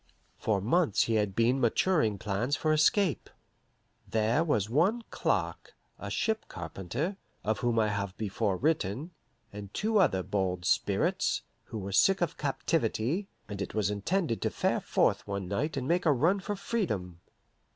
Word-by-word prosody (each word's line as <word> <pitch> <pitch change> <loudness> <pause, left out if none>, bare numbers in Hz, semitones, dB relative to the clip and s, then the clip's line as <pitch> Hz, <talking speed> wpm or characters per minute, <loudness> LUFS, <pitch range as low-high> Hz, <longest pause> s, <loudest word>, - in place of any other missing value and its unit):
For 105 -3 0
months 125 - +2
he 115 - -1
had 105 -3 +1
been 120 +3 +2
maturing 120 - +2
plans 105 +8 -1
for 155 -1 +1
escape. 155 +2 +2 0.8
There 110 - +2
was 110 - +1
one 190 - +2
Clark, - - -1 0.2
a - - -5
ship 220 -1 -1
carpenter 95 - -4 0.3
(of 110 +2 0
whom 120 -1 0
I 110 -1 +3
have 100 -2 -3
before 105 -2 -1
written), 150 - 0 0.4
and 100 -1 -8
two 215 0 +2
other 95 - +3
bold 90 -3 -1
spirits, - - +1 0.2
who 115 - -7
were 100 -1 -5
sick 195 - +4
of 175 -3 -1
captivity, 145 - -1 0.2
and 100 -1 -6
it - - -5
was 105 -2 +1
intended 115 - -1
to - - +1
fare - - 0
forth - - +1
one 100 -2 -3
night 135 - -2
and 130 -1 -2
make 175 +2 +1
a - - +6
run 165 +9 +3
for 205 +2 -3
freedom. 105 - -2
115 Hz, 160 wpm, -30 LUFS, 100-165 Hz, 0.8 s, a